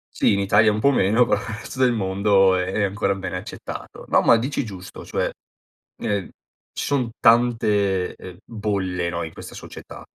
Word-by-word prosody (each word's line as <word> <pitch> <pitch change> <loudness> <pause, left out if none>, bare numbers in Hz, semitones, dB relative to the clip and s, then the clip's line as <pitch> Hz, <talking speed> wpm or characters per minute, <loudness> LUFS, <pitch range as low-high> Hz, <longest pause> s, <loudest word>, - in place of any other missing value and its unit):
Sì, - - +3
in 100 - +1
Italia 105 +2 +4
un 105 - -2
po' 140 +6 +4
meno 110 0 +3
però 105 - +2 0.2
resto 130 - -9
del 130 -1 +4
mondo 95 -2 +3
è 95 +3 -1
ancora 100 0 0
bene 95 -1 -5
accettato. 100 +3 -8
No, - - +4
ma 115 - +5
dici 130 +3 -2
giusto 95 -3 -9
cioè, - - -1 0.7
ehm, 100 -5 -2 0.4
ci - - -3
son 130 -5 0
tante, 105 -5 +2
ehm, 90 -1 -11
bolle 95 -5 -2
no, 85 0 -3
in 80 - -7
questa - - -10
società. - - -10
100 Hz, 170 wpm, -22 LUFS, 95-115 Hz, 0.7 s, ma